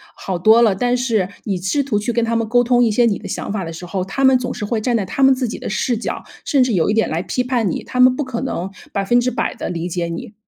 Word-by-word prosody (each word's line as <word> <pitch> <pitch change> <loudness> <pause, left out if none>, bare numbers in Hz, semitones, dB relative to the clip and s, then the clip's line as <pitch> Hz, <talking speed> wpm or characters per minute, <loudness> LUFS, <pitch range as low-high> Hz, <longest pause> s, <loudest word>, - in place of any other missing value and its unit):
好 185 -2 -4
多 220 +6 +6
了， 215 -4 +4
但 245 +5 0
是 220 -7 0
你 195 -3 -2
试 190 +11 0
图 235 -7 0
去 240 +3 -2
跟 235 0 +1
他 230 0 -1
们 225 -1 -1
沟 245 0 +4
通 245 0 +3
一 235 - +3
些 235 +3 +3
你 210 -4 +1
的 - - -8
想 205 - -4
法 195 - -2
的 165 - -6
时 165 +2 -8
候， 185 0 -3
他 230 +9 -3
们 265 -1 +5
总 250 0 -3
是 210 - -4
会 220 +1 -1
站 240 0 +1
在 200 - -2
他 275 - -4
们 270 0 +6
自 255 -2 -2
己 - - -6
的 - - -5
视 235 +3 0
角， 225 - -4 0.2
甚 275 -3 +3
至 250 -3 0
有 175 0 +2
一 210 - +2
点 225 - +2
来 160 +2 -2
批 250 +6 -2
判 245 -5 0
你， - - -3
他 250 - -5
们 255 0 +6
不 295 - -2
可 255 -2 -4
能 195 -8 -3 0.2
100% 240 +5 0
的 - - -5
理 170 0 -3
解 175 -1 -2
你。 185 +7 -6
230 Hz, 315 characters per minute, -19 LUFS, 195-250 Hz, 0.2 s, 多